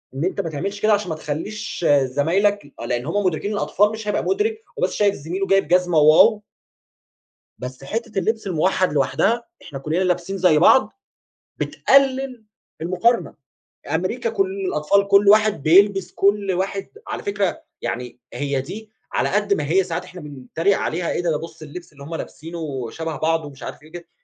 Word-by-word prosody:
إن 140 +5 -1
أنت 190 +2 -1
ما 165 - -4
تعملش 195 +7 -4
كده 215 0 +4
عشان 205 -3 0
ما 160 - -2
تخلّيش 165 +5 -5 0.2
زمايلك 175 +10 +1
ي 145 - -18
آه 115 - -5
لأن 120 +1 -2
هم 200 +5 -1
مدركين 185 +4 -1
الأطفال 205 +1 +2
مش 220 -1 -7
هيبقى 210 - 0
مدرك، 435 +3 0 0.2
هو - - -1
بس - - +1
شايف 205 -1 +2
زميله 180 +7 -4
جايب 195 -5 +3
جزمة 180 -1 +2
واو 160 +8 +6 1.2
بس 125 +1 -8
حتة 225 - -4
اللبس 220 +2 -1
الموحد 185 0 +1
لوحدها، 200 - +1 0.2
إحنا 140 -5 -8
كلنا 155 +4 -3
لابسين 180 +2 -1
زي 175 -4 +4
بعض، 210 +6 +5 0.7
بتقلل 270 -3 +2 0.4
المقارنة. 185 +8 +1 0.6
أمريكا 220 +8 -1
كُل 195 -4 0 0.2
الأطفال 190 +6 +1
كُل 200 0 +5
واحد 215 -6 +4
بيلبس 195 +3 +4
كُل 200 -1 +2
واحد 195 +2 -2 0.2
على - - -4
فكرة 200 -2 -1 0.2
يعني 125 0 -5
هي 140 -2 -1
دي 215 +10 -8 0.2
على - - +1
قد 205 0 +1
ما 150 - -2
هي 185 +3 +3
ساعات 175 0 -4
إحنا 180 0 -11
بنتريق 150 +6 -1
عليها، 170 +2 -2
إيه - - -2
ده؟ 170 - 0
ده 150 - +1
بُص 165 0 -10
اللبس 165 +2 -10
اللي 140 - -14
هم 165 - -7
لابسينه 155 -7 -6
شبه 160 +1 -5
بعضه 160 +1 0
ومش 140 -2 -12
عارف - - -8
إيه 155 +2 -17
كده. 175 -1 -10
180 Hz, 180 wpm, -21 LUFS, 155-205 Hz, 1.2 s, واو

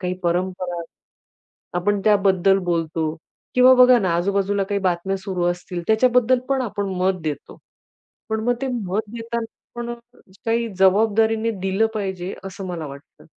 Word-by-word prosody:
काही 180 -1 -2
परंपरा. 175 0 -1 1.0
आपण 205 +3 0
त्याबद्दल 195 -2 +4
बोलतो 165 -2 -1 0.4
किंवा 255 +1 +7
बघा 250 -1 +7
ना, 190 -5 0
आजूबाजूला 200 +2 0
काही 200 +1 -2
बातम्या 185 +1 0
सुरू 185 -2 -3
असतील, 175 0 -3
त्याच्याबद्दल 250 +2 +4
पण 270 -1 +1
आपण 205 -3 -3
मत 185 0 +1
देतो. 150 -3 -5 0.7
पण 220 0 -1
मग 245 - +2
ते - - 0
मत 210 -3 -2
देताना 235 0 -4 0.3
पण 240 0 -4 0.5
काही 230 0 +1
जबाबदारीने 220 +3 +3
दिलं 195 +3 +2
पाहिजे, 190 -3 -3
असं 195 0 -7
मला 170 -4 -5
वाटतं. 140 +1 -13
195 Hz, 140 wpm, -22 LUFS, 180-225 Hz, 1.0 s, किंवा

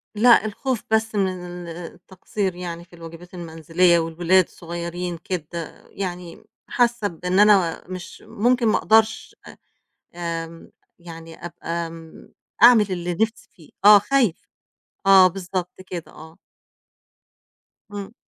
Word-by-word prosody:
لأ 230 0 +5
الخوف 235 +3 -3
بس 220 0 +1
من 180 -3 -3
التقصير 180 +3 -6
يعني 175 -1 -7
في 175 - -18
الواجبات 170 +2 -12
المنزلية 170 +1 +1
والولاد 170 +3 +2
الصغيّرين 170 +1 -6
كده، 170 -1 -7
يعني 180 -3 -6 0.2
حاسّة 240 -3 +1
بإن 180 +2 -2
أنا 200 -5 +4
مش 185 -1 -9
ممكن، 240 +2 +1
ما - - +3
اقدَرش 220 +2 +2
أ - - -12 0.6
آمم 165 -1 -6 0.3
يعني 165 -1 -11
أبقى 170 -1 -5
م 165 -1 -13 0.3
أعمل 235 -3 +8
اللي 175 -1 -3
نِفسي 225 0 -2
فيه، 175 -7 -19 0.2
آه 210 0 +10
خايفة، 230 -4 0 0.6
آه 190 -1 +8
بالضبط 180 0 -5
كده، 175 -3 -7
آه. 160 +1 -14 1.6
إمم. 205 +1 -7
180 Hz, 120 wpm, -22 LUFS, 170-205 Hz, 1.6 s, آه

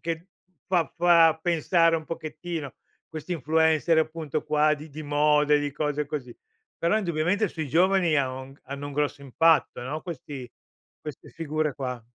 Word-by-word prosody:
che 165 +1 -4 0.4
fa 175 -4 +2
fa 170 -2 +5
pensare 165 0 +3
un 160 - -6
pochettino, 160 -2 -6 0.3
questi 160 +2 -6
influencer 160 +1 +2
appunto 155 -2 -2
qua 150 0 +3
di 150 +1 -10
di 155 +1 -8
moda 150 0 +3
e - - +5
di 145 -1 -3
cose 150 0 -2
così. 135 -5 -6 0.4
Però 170 +6 +2
indubbiamente 180 +2 0
sui 160 -3 -5
giovani 175 +1 +3
ha 135 -2 +1
o 130 +1 -8
hanno 140 +2 -7
un 145 - -7
grosso 145 0 -1
impatto, 155 0 +2
no, 145 +5 -4
questi 140 -7 -7 0.5
queste 150 -3 -9
figure 155 -2 -2
qua. 125 -3 -5
155 Hz, 160 wpm, -26 LUFS, 145-165 Hz, 0.5 s, fa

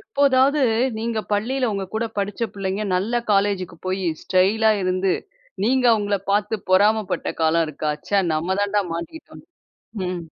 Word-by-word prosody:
எப்போதாவது, 280 -7 +2 0.4
நீங்க 230 0 -2
பள்ளியில 250 +5 0
உங்க 195 -1 -2
கூட 220 +1 0
படிச்ச 200 +3 -3
பிள்ளைங்க, 195 +1 -3
நல்ல 220 +7 0
காலேஜ்க்கு 195 -3 +1
போயி 185 -1 -1
ஸ்டைலா 210 +4 +3
இருந்து, 185 +1 +1 0.5
நீங்க 255 +2 +2
அவுங்கள 205 -2 +1
பாத்து 210 +2 0
பொறாமை 210 +3 +4
பட்ட - - -2
காலம் 160 +1 +3
இருக்கா? 150 0 -2 0.2
ச்ச 200 -1 +3
நம்ம 175 +5 -1
தாண்ட 205 0 +1
மாட்டிக்கிட்டோன்னு. 170 - -8 0.6
ம். 180 -1 -3
205 Hz, 140 wpm, -22 LUFS, 185-225 Hz, 0.6 s, பொறாமை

